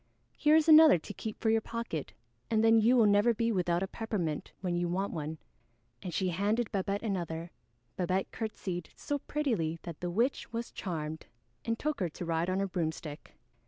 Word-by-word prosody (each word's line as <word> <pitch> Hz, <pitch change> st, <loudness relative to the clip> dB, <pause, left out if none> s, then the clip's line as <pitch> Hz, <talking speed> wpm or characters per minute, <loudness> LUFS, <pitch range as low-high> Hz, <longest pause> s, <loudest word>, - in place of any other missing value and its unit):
Here 300 Hz, 0 st, +4 dB
is 320 Hz, 0 st, +4 dB
another 315 Hz, -, +9 dB
to 155 Hz, -, -8 dB
keep 220 Hz, -1 st, -6 dB
for 220 Hz, -, +2 dB
your 225 Hz, 0 st, +3 dB
pocket, 230 Hz, -11 st, -5 dB, 0.4 s
and 220 Hz, -1 st, +2 dB
then 225 Hz, 0 st, +6 dB
you 235 Hz, +4 st, +4 dB
will 230 Hz, -, +6 dB
never 205 Hz, +3 st, +4 dB
be 230 Hz, +1 st, +1 dB
without 175 Hz, -3 st, +1 dB
a -, -, -2 dB
peppermint 190 Hz, -9 st, -3 dB
when 180 Hz, -2 st, -2 dB
you 175 Hz, 0 st, 0 dB
want 190 Hz, +3 st, -1 dB
one." 155 Hz, -1 st, -4 dB, 0.6 s
And 180 Hz, -, -5 dB
she 185 Hz, +2 st, 0 dB
handed 205 Hz, +6 st, 0 dB
Babette 200 Hz, 0 st, -1 dB
another. 170 Hz, -5 st, -3 dB, 0.5 s
Babette 185 Hz, +1 st, 0 dB
curtseyed 185 Hz, -6 st, -4 dB
so 290 Hz, 0 st, -3 dB
prettily 230 Hz, -, -1 dB
that 170 Hz, -3 st, -7 dB
the 175 Hz, -, -3 dB
witch 235 Hz, +10 st, 0 dB
was 230 Hz, 0 st, -4 dB
charmed 160 Hz, -4 st, -5 dB, 0.4 s
and 230 Hz, 0 st, 0 dB
took 300 Hz, +1 st, -2 dB
her 180 Hz, -3 st, 0 dB
to 175 Hz, -, -7 dB
ride 165 Hz, +1 st, 0 dB
on 185 Hz, +1 st, 0 dB
her 195 Hz, -, 0 dB
broomstick. 160 Hz, -4 st, -4 dB
195 Hz, 190 wpm, -31 LUFS, 170-230 Hz, 0.6 s, another